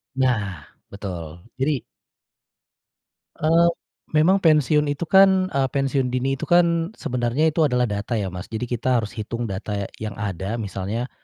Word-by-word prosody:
Nah 105 - 0 0.2
betul, 85 -5 -7 0.2
jadi 135 -1 0 1.5
Eee, 165 +2 +4 0.5
memang 175 +6 +5
pensiun 150 -3 +3
itu 145 +3 -2
kan, 190 +1 +5
eee, 135 -1 +1
pensiun 135 -1 +1
dini 130 +1 0
itu - - -4
kan 170 +2 +3
sebenarnya 125 +6 0
itu 160 - -3
adalah 125 -2 +1
data 105 +3 -2
ya, 100 -4 -2
Mas. 90 +2 -7
Jadi, 110 +1 -4
kita 125 +1 +1
harus 110 - -6
hitung 115 +2 -4
data 95 +2 -4
ya 100 -1 -2
yang 110 -1 -5
ada 100 0 -3
misalnya, 110 +2 -4
125 Hz, 150 wpm, -23 LUFS, 105-155 Hz, 1.5 s, memang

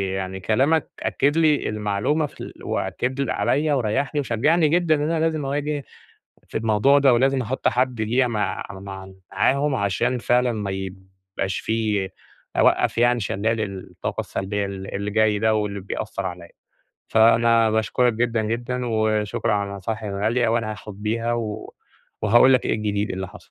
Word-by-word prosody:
يعني 95 0 -4
كلامَك 135 - +1
أكِّد 145 +4 +1
لي 155 -3 +3
المعلومة 105 +9 0
في 145 - -11
ال - - -7
وأكِّد 130 +2 -2
عليَّ 150 +1 +1
وريحني 135 +4 0
وشجعني 150 +6 +2
جدًا 170 -1 +3
إن 145 - -2
أنا 165 - 0
لازم 160 -3 0
أواجه 145 +1 -2 0.7
في - - -2
الموضوع 115 +6 +3
ده، 135 -2 +5
ولازم 135 +2 +2
أحط 125 +3 -1
حد 125 -1 0
ليَّ 120 +4 +2
مع 105 -3 -2
مع 95 0 -8 0.2
معاهم، 140 +8 +2
عشان 120 +4 0
فعلًا 125 +1 +2
ما 105 -3 -3
يبقاش 95 0 -5
في 105 -4 -1 0.5
أوقف - - +3
يعني 120 0 +3
شلال 110 +3 -1 0.3
الطاقة - - -4
السلبيّة 100 +1 -3
ال 95 0 -7
اللي 100 +1 -2
جاي 110 -1 +2
ده 110 +1 +2
واللي 105 -2 -2
بيأثر 100 0 -4
عليَّ. 90 -1 -7 0.6
فأنا 115 0 +4
باشكرَك 110 +2 +2
جدًا، 115 0 0
جدًا، 120 +3 -2
وشكرًا 110 -2 0
على 100 -1 -1
النصايح 100 +3 -4
الغالية، 110 +4 0
وأنا 115 -1 0
هاخد 105 -1 -10
بيها 115 +2 -1
و 110 -2 -5 0.5
وهاقول 120 +5 +6
لَك 125 - +2
إيه - - +1
الجديد 105 -1 -1
اللي 95 0 -4
حصل. - - -15
110 Hz, 155 wpm, -23 LUFS, 100-130 Hz, 0.7 s, وهاقول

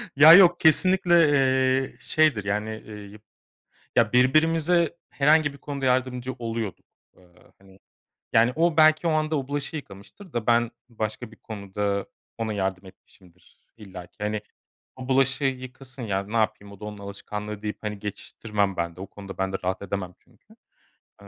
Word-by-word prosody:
Ya, 155 +3 +9
yok 175 -1 +7
kesinlikle, 175 -1 +5
eee, 130 -1 +2
şeydir, 155 -10 +2
yani, 105 +2 -2 0.2
eee, 110 - -10
yıp 105 0 -12 0.7
ya, 115 -1 +3
birbirimize 160 +6 +3
herhangi 145 +3 +3
bir - - -13
konuda 140 -1 -5
yardımcı 130 0 0
oluyorduk. 115 -4 -5 0.3
Eee, 90 - -21 0.4
hani, 95 0 -20 0.5
yani 115 +2 +4
o 165 -1 +2
belki 155 +1 +5
o - - +3
anda 155 0 0
o 135 0 -5
bulaşığı 145 +2 -4
yıkamıştır 140 - -12
da 120 -2 -3
ben 120 0 +3 0.2
başka 110 0 -5
bir - - -15
konuda 100 -1 -4 0.3
ona 110 -1 -2
yardım 95 -1 -3
etmişimdir 90 -1 -21 0.2
illaki. 95 -5 -12
"Hani, 105 0 -2 0.6
o 130 0 -9
bulaşığı 135 +1 +2
yıkasın 130 -1 -5
ya, 100 -4 -1
ne 105 +4 -6
yapayım 105 -2 -1
o 100 - -15
da - - -8
onun 105 -1 -7
alışkanlığı," 105 +1 -7
deyip, 105 0 -4
hani, 105 -1 -4
geçiştirmem 105 -1 -3
ben 85 -1 -3
de - - -12
o 95 - -6
konuda 100 -1 -11
ben 95 0 -1
de 95 - 0
rahat 95 +2 -2
edemem 95 -2 -5
çünkü, 220 +2 -25 0.7
eee - - -14
115 Hz, 165 wpm, -25 LUFS, 100-140 Hz, 0.7 s, Ya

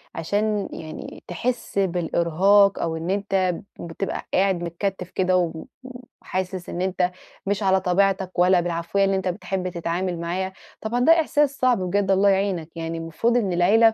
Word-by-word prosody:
عشان 205 +4 -1
يعني 155 -1 -8
تحِس 225 +3 -2
بالإرهاق، 185 +2 +3
أو 165 -1 -1
إن 165 +3 -4
أنتَ 190 -3 0 0.2
بتبقى 170 +3 -4
قاعد 190 -2 +2
متكتِّف 180 +2 -3
كده، 185 -1 +1
و 165 -2 -2 0.6
وحاسس 185 -1 -4
إن 175 - -4
أنتَ 185 -1 0 0.3
مش 200 +1 -1
على 190 -1 +3
طبيعتك، 190 0 +1
ولا 180 0 +5
بالعفوية 170 +3 0
اللي 195 - +1
أنتَ 190 -1 -2
بتحِب 185 +1 -2
تتعامل 175 0 -2
معايا، 185 +3 -3 0.3
طبعًا 235 +3 -1
ده 315 +7 +5
إحساس 290 -2 +1
صعب 250 -4 +3
بجد، 195 +2 0
الله 195 +1 +4
يعينَك 190 -4 0
يعني. 165 0 -4
المفروض 165 +9 0
إن 195 -6 0
العيلة 220 +6 +5
185 Hz, 155 wpm, -23 LUFS, 175-200 Hz, 0.6 s, ولا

